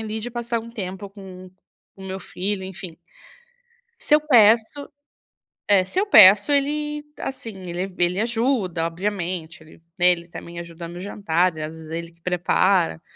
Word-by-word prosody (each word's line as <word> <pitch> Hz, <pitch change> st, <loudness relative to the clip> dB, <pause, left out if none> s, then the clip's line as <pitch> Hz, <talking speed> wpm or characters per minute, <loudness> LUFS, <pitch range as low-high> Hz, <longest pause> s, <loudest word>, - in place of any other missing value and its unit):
ali 220 Hz, 0 st, -4 dB
de 240 Hz, +3 st, -6 dB
passar 235 Hz, 0 st, -3 dB
um 230 Hz, +1 st, -11 dB
tempo 195 Hz, -2 st, -6 dB
com 185 Hz, -2 st, -12 dB, 0.5 s
com 190 Hz, -, -12 dB
o -, -, -8 dB
meu 190 Hz, +1 st, -4 dB
filho, 190 Hz, +1 st, -4 dB
enfim. 185 Hz, -3 st, -8 dB, 1.0 s
Se 300 Hz, -, +2 dB
eu 300 Hz, -, +5 dB
peço 235 Hz, 0 st, +4 dB, 0.8 s
é, 195 Hz, -2 st, +4 dB
se 370 Hz, -, -2 dB
eu 415 Hz, -, 0 dB
peço 205 Hz, -, +8 dB
ele, 295 Hz, +1 st, 0 dB, 0.2 s
assim, 235 Hz, -4 st, -5 dB, 0.2 s
ele 180 Hz, +2 st, -4 dB
ele 175 Hz, +2 st, +1 dB
ajuda. 225 Hz, -7 st, 0 dB
Obviamente 175 Hz, -2 st, -4 dB
ele 155 Hz, -, -17 dB, 0.2 s
né, 180 Hz, -, +4 dB
ele 170 Hz, -1 st, 0 dB
também 170 Hz, 0 st, -9 dB
ajuda 170 Hz, 0 st, -8 dB
no 175 Hz, +1 st, -9 dB
jantar 185 Hz, -3 st, 0 dB
e -, -, -5 dB
às 155 Hz, +1 st, -6 dB
vezes 160 Hz, -1 st, -11 dB
ele 170 Hz, 0 st, -5 dB
que 170 Hz, 0 st, -31 dB
prepara, 180 Hz, -1 st, +1 dB
190 Hz, 170 wpm, -22 LUFS, 175-225 Hz, 1.0 s, peço